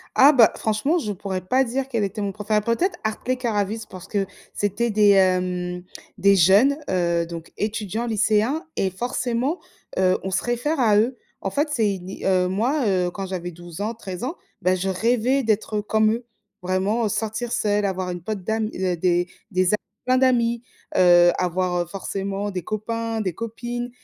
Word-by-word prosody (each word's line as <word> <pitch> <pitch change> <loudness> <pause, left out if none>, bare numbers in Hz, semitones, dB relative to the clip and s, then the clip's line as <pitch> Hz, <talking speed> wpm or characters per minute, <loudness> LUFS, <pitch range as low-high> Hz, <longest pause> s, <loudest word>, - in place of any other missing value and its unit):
Ah, 280 +3 +8
bah, 240 -6 +6
franchement, 220 +10 +1
je 215 -10 -2
pourrais 190 -1 -4
pas 260 +7 +3
dire 260 +2 -2
quel 230 -5 0
était 200 +2 -4
mon 200 -1 -2
préféré, 210 +1 0
peut-être 230 - 0
Hartley, 230 +4 -1
Cœurs 240 -4 -2
à 205 - +3
vif 220 +3 -5
parce 185 0 -10
que 200 -2 0 0.3
c'était 205 +4 0
des, 210 -1 +5
hem, 180 -2 +2 0.4
des 200 0 +5
jeunes, 200 - +5
heu, 170 -2 +1
donc 165 -1 -8
étudiants, 215 +2 -2
lycéens 220 - +1
et 190 - +1
forcément, 245 - -2 0.4
heu, 185 0 +3
on 190 - -3
se 190 - 0
réfère 245 +5 -1
à 215 -4 +4
eux. 240 +4 +1 0.2
En 195 - -3
fait 290 +9 0
c'est 220 -7 +1
une 185 0 -8
é - - -8
heu, 185 -1 +3
moi, 245 +10 0
heu, 180 -3 +1
quand 195 +1 -5
j'avais 180 -2 -5
12 175 +1 -10
ans, 215 +3 -2
13 190 -3 -6
ans, 300 +8 -3 0.3
bah, 185 +1 +3
je 185 +1 -2
rêvais 240 +7 +1
d'être, 215 -1 0
heu, - - -1
comme 215 +1 +2
eux, 235 +2 -3 0.4
vraiment, 190 +5 0
heu. - - +1
Sortir 220 +3 -2
seule, 205 -1 +1
avoir 190 -2 -1
une 175 -1 -5
pote 205 +1 -4
d'am 220 +2 -1
heu, 185 -1 -1
des 175 +1 +1 0.2
des 185 +1 +2
a - - +4 0.3
plein 255 +1 +3
d'amis, 235 -3 +2 0.3
heu, 175 -1 +7
avoir, 180 0 0
heu, - - -7
forcément 195 +2 -4
des 185 -2 -4
copains, 225 +3 -3
des 185 -5 -2
copines 240 +3 -5
210 Hz, 195 wpm, -23 LUFS, 185-235 Hz, 0.4 s, Ah